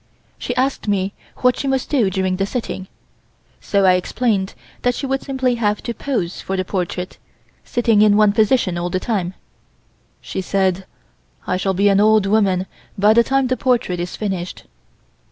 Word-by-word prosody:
She - - -3
asked 265 -2 -1
me 195 -1 0 0.3
what 250 -1 +5
she 275 - -2
must 265 -1 -1
do 245 -9 +3
during 185 0 -1
the 195 +1 0
sitting, 205 -5 -4 0.7
so 200 -1 +1
I 185 - +6
explained 195 +1 0 0.3
that 245 0 +1
she - - -4
would 270 0 -1
simply 260 -2 0
have 210 -1 0
to 235 - -3
pose 225 -10 -3
for 195 - -3
the 185 - -1
portrait, 180 -1 -4 0.4
sitting 230 -3 +2
in 210 -1 +5
one 210 -1 +5
position 215 -5 +2
all 175 +1 -2
the 185 - -1
time 190 -4 -2 0.8
She - - -5
said: 190 -1 0 0.6
"I 185 - 0
shall 190 +1 -1
be 200 +3 +3
an 195 -1 +4
old 215 -1 +4
woman 195 -3 +2 0.3
by 205 +2 +5
the 235 +1 +5
time 270 +2 +1
the 255 0 0
portrait 235 -8 0
is 175 +1 -4
finished." 190 -4 -4
205 Hz, 175 wpm, -20 LUFS, 185-240 Hz, 0.8 s, I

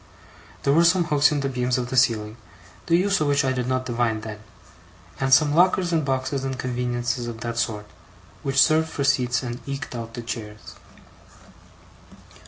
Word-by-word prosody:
There 140 - +3
were 165 +3 +5
some 175 +1 +4
hooks 150 -3 +3
in 145 -1 0
the 135 - -1
beams 125 -1 -1
of 125 -1 -4
the - - -2
ceiling, 110 -4 +2 0.5
the 170 - +4
use 195 0 +1
of 150 - +1
which 145 0 +2
I 130 - +1
did 125 -1 -2
not 130 0 -1
divine 115 -3 -1
then; 110 -1 -7 0.8
and 135 0 -1
some 145 +2 +5
lockers 180 +1 +3
and 160 -2 +2
boxes 135 0 -2
and 135 -1 -3
conveniences 120 -1 -2
of 115 -1 -7
that 115 0 -3
sort, 110 -3 -2 0.6
which 135 -1 0
served 160 +2 +4
for 140 - -3
seats 125 -2 +1
and 120 0 -5
eked 140 -1 -5
out 115 -1 -7
the 120 - -6
chairs. 110 -2 -7
130 Hz, 185 wpm, -23 LUFS, 120-145 Hz, 0.8 s, were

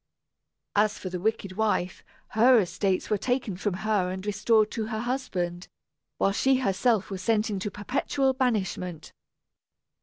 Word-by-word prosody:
As 210 +1 +3
for 185 - -6
the 180 - -3
wicked 200 -1 -2
wife, 210 -4 0 0.3
her 240 +3 +5
estates 185 +1 -1
were 210 - +2
taken 245 -5 -1
from 200 0 -2
her 205 -4 +1
and 185 +1 -5
restored 215 +1 +2
to 220 -2 -3
her 220 -1 -3
husband, 185 -9 -3 0.5
while 195 - +2
she 265 +7 +3
herself 220 -3 +1
was 190 -1 -4
sent 215 +2 +1
into 205 +1 -2
perpetual 265 +6 0
banishment. 190 - -2
210 Hz, 145 wpm, -27 LUFS, 185-230 Hz, 0.5 s, her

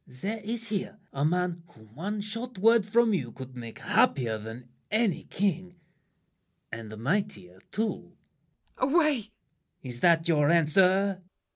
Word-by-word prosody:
There 200 - -5
is 225 +2 -5
here 205 0 -3 0.2
A 140 - -1
man 175 +2 0
whom 110 -8 -19
one 205 - -3
short 230 +3 -5
word 225 +1 +4
from 230 +1 +3
you 130 -11 -1
could 130 0 -10
make 115 -2 -8
Happier 115 -5 +2
than 115 +3 -9 0.2
any 215 -4 +1
king, 180 -2 -1 1.0
and 110 -1 -7
mightier 130 - -2
too! 220 +2 0
MARION. - - -7 0.7
Away! 275 +5 +1 0.2
LAFFEMAS. 220 -4 -6 0.6
Is 125 -2 -7
that 165 +2 +4
your 150 -3 +3
answer? 185 +4 +3
180 Hz, 140 wpm, -28 LUFS, 130-210 Hz, 1.0 s, word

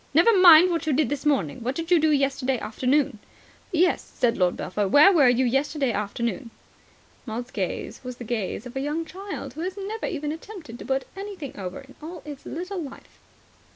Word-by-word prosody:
"Never 380 +8 +6
mind 360 -1 +8
what 335 -1 -2
you 305 - +2
did 285 -1 +2
this 290 +1 -2
morning. 240 - 0
What 255 +3 -2
did 330 +2 -5
you 350 - +6
do 315 0 +3
yesterday 275 -2 +1
afternoon?" 260 +2 0 0.5
"Yes," 360 +1 +2
said 240 -1 -1
Lord 180 -2 +1
Belpher. 205 +1 -2
"Where 290 - +7
were 285 -7 +6
you 250 +1 +3
yesterday 270 +1 0
afternoon?" 230 +4 -3 0.8
Maud's 240 +3 -5
gaze 200 +4 -4
was 250 -1 -7
the - - -7
gaze 220 -2 -3
of 245 - -9
a - - -1
young 300 +4 -2
child 375 -7 -7
who 310 - -7
has 370 +3 -4
never 420 +3 -4
even 300 -3 -3
attempted 320 - -9
to - - -8
put 265 0 -1
anything 390 -8 -7
over 185 +1 -6
in 270 0 -16
all 325 +1 -8
its 290 -2 -9
little 365 +3 -4
life. 275 -4 -11
280 Hz, 195 wpm, -25 LUFS, 245-330 Hz, 0.8 s, mind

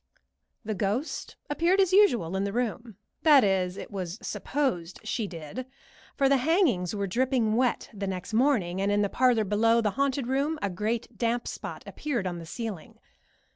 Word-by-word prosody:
The 215 - -1
ghost 210 - -2
appeared 335 +6 +2
as 380 -2 +3
usual 240 - +4
in 190 - 0
the 200 - -2
room 230 -2 -3 0.2
that 295 -4 +7
is, 190 -2 +1
it - - -8
was 185 -2 -4
supposed 190 - -2
she 215 0 -2
did, 175 - -7 0.5
for 275 - +3
the 275 0 +4
hangings 255 - +2
were 200 -1 -1
dripping 235 +1 +1
wet 250 0 0
the 200 -1 -4
next 190 +3 -5
morning, 215 -8 +2
and 200 +1 +1
in 205 0 +2
the 200 - 0
parlor 245 -2 +3
below 225 +3 +3
the 215 -3 +1
haunted 275 +1 0
room 280 +5 0
a 200 - -2
great 220 +5 -3
damp 235 +1 0
spot - - -6
appeared 255 -10 -3
on 175 -2 -3
the 165 - -9
ceiling. 220 -4 -6
225 Hz, 175 wpm, -27 LUFS, 195-265 Hz, 0.5 s, that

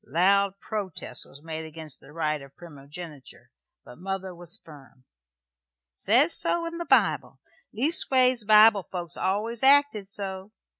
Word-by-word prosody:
Loud 195 +5 +2
protest 205 -6 -5
was 140 +2 -15
made 160 -1 -6
against 160 -2 -7
the - - -17
right 155 -2 -2
of 140 0 -15
primogeniture, 150 -1 -12 0.3
but 125 - -14
mother 190 0 -5
was 175 -1 -7
firm. 140 -4 -17 0.9
"Says 250 - +2
so 340 -1 0
in 335 0 -6
the 340 - -5
Bible. - - +1 0.3
Leastways, 255 -3 +2
Bible 215 -1 +5
folks 175 -2 -5
always 215 +5 -2
acted 275 -7 +5
so. 195 0 -6
190 Hz, 135 wpm, -26 LUFS, 160-220 Hz, 0.9 s, Bible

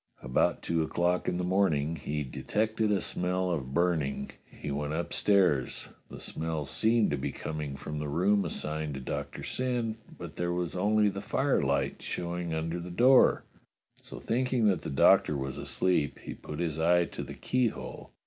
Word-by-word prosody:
About 65 0 +1
two 85 -1 +1
o'clock 85 +3 0
in 90 - -1
the 90 - -1
morning 85 -5 +2
he 75 0 -3
de 65 - -7
tected 110 0 0
a 100 -3 +2
smell 90 0 -1
of 70 -6 -3
burning. 85 -5 0 0.2
He 75 - -6
went 75 +1 -2
upstairs. 85 -3 +1 0.2
The - - -9
smell 80 -2 -3
seemed 110 +5 +2
to 75 - 0
be - - -2
coming 75 -3 -5
from 75 +2 -5
the 75 - -3
room 95 +7 +2
assigned 75 -1 -3
to - - -4
Doctor 65 - -5
Syn, 120 -3 -2 0.2
but - - -9
there 85 0 0
was 90 -1 -2
only 105 +3 +3
the - - -5
firelight - - 0
showing 85 -1 -3
under 80 +2 -2
the 85 +1 -7
door, 125 +8 +5 0.6
so - - -9
thinking 125 0 +1
that 90 -5 +1
the - - -5
Doctor 75 +2 +4
was 65 -1 -4
asleep, 90 -6 0
he - - -7
put 75 - -8
his 80 -2 -2
eye 85 +1 +4
to - - -7
the - - -7
keyhole. 125 -3 -2
85 Hz, 175 wpm, -29 LUFS, 75-100 Hz, 0.6 s, door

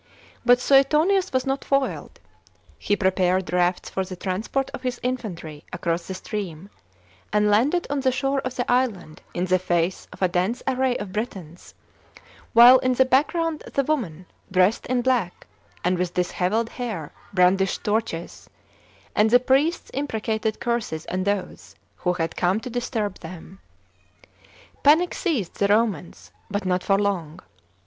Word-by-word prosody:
But 245 0 +5
Suetonius 300 +9 +3
was 260 -1 0
not 270 +1 -1
foiled. 275 -1 -1 0.6
He 205 - +1
prepared 185 -3 +1
rafts 180 0 +1
for 190 - -1
the 185 0 -7
transport 205 +9 -2
of - - -7
his 250 -2 -3
infantry 175 -12 -4
across 170 -1 -2
the 190 - -5
stream, 190 -2 -6 0.6
and 210 0 +3
landed 280 +12 +2
on 285 0 -1
the 260 -1 +2
shore 275 +1 0
of 255 -1 -4
th^ 245 - -1
island 235 -11 -1
in 175 - 0
the 185 0 +2
face 175 0 -1
of - - -6
a - - +5
dense 180 +6 -1
array 260 -1 +1
of 205 -2 -6
Britons, 190 -6 -6 0.8
while 245 +3 +9
in 255 0 +1
the 260 - +4
background 305 +5 +1
the 275 - +2
women, 210 - -2 0.3
dressed 185 +3 +2
in 250 -1 0
black, 240 -9 0 0.4
and 180 0 +1
with 180 -1 -2
dishevelled 185 +5 0
hair, 220 - -5 0.2
brandished 190 0 +2
torches, 210 -6 -3 0.7
and 210 +1 +4
the 245 +2 +6
priests 275 +7 +1
imprecated 220 -5 -2
curses 235 -10 -2
on 185 +1 -1
those 200 -2 -3 0.2
who 180 -1 0
had 165 -2 -3
come 180 +4 +1
to 250 - -7
disturb 225 -4 -3
them. 180 +3 -10 1.2
Panic 315 +5 +4
seized 275 - -2
the 200 - +3
llomaus, 205 -5 0 0.2
but 205 -1 -3
not 180 0 +1
for 195 +1 +2
long. 185 -5 -2
210 Hz, 150 wpm, -24 LUFS, 180-255 Hz, 1.2 s, while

